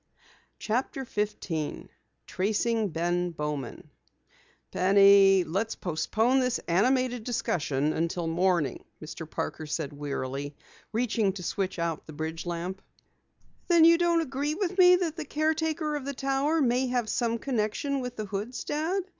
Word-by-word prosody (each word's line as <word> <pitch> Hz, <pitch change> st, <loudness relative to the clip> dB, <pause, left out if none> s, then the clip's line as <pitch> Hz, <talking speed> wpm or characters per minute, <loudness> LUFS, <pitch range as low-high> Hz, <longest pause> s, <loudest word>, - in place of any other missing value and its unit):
CHAPTER 255 Hz, +4 st, -2 dB
15 205 Hz, -8 st, -3 dB, 0.4 s
TRACING 220 Hz, +2 st, 0 dB
BEN 175 Hz, +2 st, -1 dB
BOWMAN 150 Hz, -6 st, -5 dB, 0.8 s
"Penny, 195 Hz, 0 st, +6 dB
let's 195 Hz, +8 st, -2 dB
postpone 220 Hz, +9 st, +1 dB
this 250 Hz, -1 st, +1 dB
animated 245 Hz, +6 st, +2 dB
discussion 155 Hz, -, -1 dB
until 170 Hz, +1 st, -1 dB
morning," 170 Hz, -4 st, 0 dB, 0.2 s
Mr. 160 Hz, 0 st, -8 dB
Parker 155 Hz, -, -4 dB
said 150 Hz, -1 st, -3 dB
wearily, 145 Hz, 0 st, -4 dB, 0.4 s
reaching 225 Hz, -3 st, +1 dB
to 185 Hz, -2 st, -7 dB
switch 190 Hz, +2 st, -2 dB
out 170 Hz, -2 st, -3 dB
the 155 Hz, -, -9 dB
bridge 160 Hz, +3 st, -5 dB
lamp. 175 Hz, +3 st, -4 dB, 0.9 s
"Then 340 Hz, -2 st, +6 dB
you 335 Hz, 0 st, +6 dB
don't 340 Hz, -1 st, +3 dB
agree 290 Hz, +1 st, -2 dB
with 380 Hz, 0 st, -2 dB
me 360 Hz, 0 st, +8 dB
that 350 Hz, -3 st, -2 dB
the 320 Hz, -, -3 dB
caretaker 310 Hz, 0 st, -1 dB
of 285 Hz, -3 st, -4 dB
the 280 Hz, 0 st, -4 dB
Tower 275 Hz, +4 st, +1 dB
may 255 Hz, 0 st, +2 dB
have 245 Hz, -2 st, -1 dB
some 230 Hz, +1 st, 0 dB
connection 255 Hz, +3 st, -1 dB
with 250 Hz, -1 st, -5 dB
the 215 Hz, -, -4 dB
Hoods, 205 Hz, +5 st, -4 dB
Dad?" 330 Hz, +6 st, -1 dB
215 Hz, 140 wpm, -28 LUFS, 170-270 Hz, 0.9 s, me